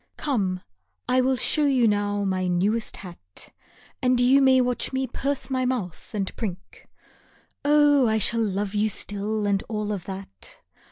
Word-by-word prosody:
Come, 195 -11 -1 0.5
I 255 0 +3
will 260 +1 +2
show 255 +4 +2
you 255 -4 +3
now 205 -1 0
my 185 -1 -1
newest 200 +6 0
hat, 170 - -11 0.5
And 250 -1 +2
you 260 +3 +5
may 265 -1 +5
watch 250 -1 0
me 265 0 -1
purse 275 +1 -3
my 260 -1 0
mouth 240 -10 -3
and 195 -2 -3
prink. 190 -5 -7 0.8
Oh, 290 -2 +4
I 220 0 +2
shall 230 +2 +2
love 205 -1 -2
you 210 +1 +1
still 205 +1 -2
and 200 -1 +1
all 210 -1 -2
of 195 -4 -4
that. 190 - -9
215 Hz, 160 wpm, -24 LUFS, 195-255 Hz, 0.8 s, you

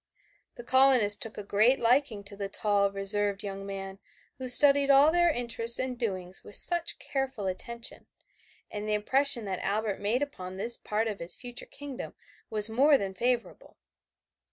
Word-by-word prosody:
The 240 - -10
colonists 255 -5 +6
took 225 - -7
a 210 - -6
great 215 +6 +2
liking 235 -3 +1
to 200 0 -9
the 200 -1 -5
tall, 200 -1 0
reserved 200 +1 +1
young 195 -1 -7
man 195 0 -7 0.4
who 255 -1 -5
studied 280 +2 +4
all 280 +3 +6
their 345 0 +3
interests 235 -4 +1
and 260 -1 -3
doings 190 -6 -5
with 205 - -12
such 345 -1 0
careful 265 -6 -4
attention, 235 +5 -6 0.6
and 210 +1 -5
the 210 - +1
impression 245 +2 +2
that 190 -2 -4
Albert 205 0 -2
made 225 +7 -1
upon 185 -10 -8
this 230 +5 0
part 220 +1 -3
of 210 -2 -5
his 170 - -4
future 245 -1 -9
kingdom 285 -2 -9 0.3
was 210 -1 +6
more 275 +6 +4
than 195 -4 -5
favorable. 240 +4 -3
225 Hz, 165 wpm, -28 LUFS, 200-260 Hz, 0.6 s, colonists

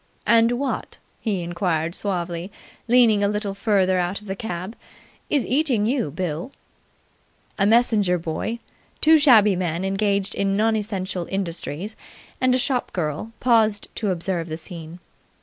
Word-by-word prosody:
"And 230 +1 +4
what," 265 +2 -3 0.2
he 200 -6 -2
inquired 170 -2 -1
suavely, 175 -2 -2 0.4
leaning 230 -4 +5
a - - +4
little 210 -1 -2
further 195 -3 +2
out 180 +2 -1
of 210 - -16
the 195 -1 -4
cab, 190 0 -5 0.5
"is 285 -4 +1
eating 260 -6 +1
you, 240 - 0
Bill?" 175 - -4 1.1
A 200 - +4
messenger 215 -5 +3
boy, 170 +7 -3 0.4
two 315 0 +6
shabby 220 -9 +6
men 175 0 -2
engaged 200 0 0
in 195 0 0
non 220 +1 +2
essential 190 -4 -3
industries, 190 +1 -4 0.5
and 255 -1 +4
a - - +3
shop 255 -1 0
girl 160 +5 -3
paused 220 -4 +2
to 210 - -1
observe 175 -2 -2
the 155 - -4
scene. 165 -1 -9
200 Hz, 145 wpm, -23 LUFS, 175-225 Hz, 1.1 s, two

